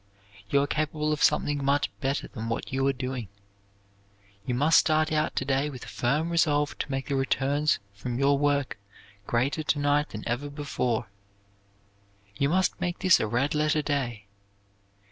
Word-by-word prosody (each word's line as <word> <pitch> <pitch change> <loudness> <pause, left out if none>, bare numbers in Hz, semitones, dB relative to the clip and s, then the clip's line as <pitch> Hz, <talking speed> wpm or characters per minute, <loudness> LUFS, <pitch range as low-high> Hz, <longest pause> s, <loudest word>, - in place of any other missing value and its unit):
"You 140 +4 +3
are - - +1
capable 155 +1 -1
of 150 - -4
something 145 -1 +2
much 140 +1 +1
better 135 +1 -1
than 115 0 -6
what 115 - -4
you 135 +1 +1
are - - +4
doing. 130 -4 -4 1.2
You 125 - 0
must 150 +6 +5
start 155 0 +2
out 155 0 0
to 130 - -1
day 135 +2 +1
with 130 -4 -8
a - - -9
firm 150 +7 0
resolution 150 -3 +1
to - - -3
make 135 0 -2
the 140 - -2
returns 140 +3 +1 0.2
from 120 +5 -5
your 140 +1 +3
work 145 -5 0 0.5
greater 130 +6 0
to 150 - 0
night 145 +1 +1
than 105 - -7
ever 120 +5 -2
before. 125 -7 -2 1.2
You 140 +6 +1
must 185 +2 +1
make 175 0 -1
this 185 -2 +5
a 110 - 0
red 130 +7 0
letter 150 0 +1
day. 125 -8 -2
140 Hz, 170 wpm, -27 LUFS, 130-150 Hz, 1.2 s, must